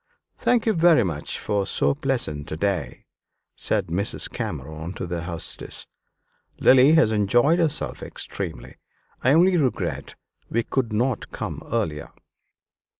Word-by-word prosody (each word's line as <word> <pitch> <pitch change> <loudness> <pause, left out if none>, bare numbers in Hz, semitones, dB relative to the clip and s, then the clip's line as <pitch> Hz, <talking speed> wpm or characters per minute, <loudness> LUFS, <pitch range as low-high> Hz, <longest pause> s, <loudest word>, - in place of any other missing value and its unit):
"Thank 245 -2 +1
you 220 - +3
much 135 - +2
for 100 -2 -1
so - - +2
pleasant 125 - -2
a 80 - -3
day," 90 -8 -2 0.5
said - - 0
Mrs. 95 +5 -2
Cameron 80 +6 -5
to - - -5
the 85 -1 -4
hostess. 85 -2 -4 0.7
"Lily 130 +4 +6
has 160 -9 +5
enjoyed 120 - +3
herself 155 -3 -1
extremely. - - -6 0.5
I 130 - +5
only 180 +3 +5
regret 135 -6 -1 0.3
we 115 +1 0
could 125 -2 -1
not 120 +2 -1
come - - -5
earlier." 85 -11 -2
110 Hz, 125 wpm, -24 LUFS, 85-140 Hz, 0.7 s, Lily